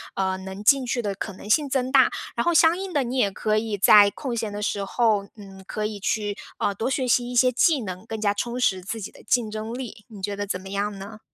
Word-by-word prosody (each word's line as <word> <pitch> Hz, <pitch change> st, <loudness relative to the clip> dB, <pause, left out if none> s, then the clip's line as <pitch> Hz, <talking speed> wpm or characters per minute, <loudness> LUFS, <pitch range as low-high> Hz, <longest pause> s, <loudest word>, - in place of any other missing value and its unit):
嗯， 190 Hz, -1 st, -1 dB
能 190 Hz, +2 st, -7 dB
进 270 Hz, +3 st, +4 dB
去 245 Hz, 0 st, -1 dB
的 205 Hz, -3 st, -3 dB
可 200 Hz, -, -5 dB
能 200 Hz, -, -11 dB
性 290 Hz, +7 st, +3 dB
增 260 Hz, -1 st, -1 dB
大。 275 Hz, -, +5 dB, 0.2 s
然 -, -, -1 dB
后 345 Hz, -, +3 dB
相 325 Hz, +1 st, +5 dB
应 380 Hz, -1 st, -5 dB
的， 285 Hz, -3 st, +2 dB
你 250 Hz, +2 st, -3 dB
也 205 Hz, -6 st, +2 dB
可 215 Hz, +2 st, 0 dB
以 215 Hz, -1 st, -2 dB
在 205 Hz, +1 st, +7 dB
空 260 Hz, -1 st, -5 dB
闲 220 Hz, -2 st, -3 dB
的 205 Hz, -, -5 dB
时 200 Hz, -1 st, -1 dB
候， 215 Hz, -2 st, +1 dB
嗯， 195 Hz, -2 st, -12 dB
可 215 Hz, +2 st, -3 dB
以 210 Hz, -1 st, -4 dB
去， 205 Hz, +1 st, -1 dB, 0.2 s
嗯， 200 Hz, -, 0 dB
多 225 Hz, +5 st, -2 dB
学 265 Hz, -1 st, -1 dB
习 245 Hz, 0 st, +2 dB
一 250 Hz, -, -5 dB
些 255 Hz, +1 st, +5 dB
技 290 Hz, +3 st, +3 dB
能， 185 Hz, -1 st, -7 dB
更 220 Hz, -1 st, -6 dB
加 205 Hz, -1 st, +2 dB
充 235 Hz, +4 st, -3 dB
实 190 Hz, -6 st, +1 dB
自 220 Hz, +4 st, -5 dB
己 190 Hz, -, -6 dB
的 -, -, -17 dB
竞 230 Hz, 0 st, +1 dB
争 215 Hz, +1 st, -5 dB
力， 230 Hz, -5 st, -8 dB
你 210 Hz, -4 st, -12 dB
觉 200 Hz, +1 st, -3 dB
得 205 Hz, 0 st, -3 dB
怎 185 Hz, -2 st, -3 dB
么 190 Hz, -, -10 dB
样 200 Hz, +1 st, -2 dB
呢？ 200 Hz, +3 st, -9 dB
215 Hz, 285 characters per minute, -24 LUFS, 200-245 Hz, 0.2 s, 在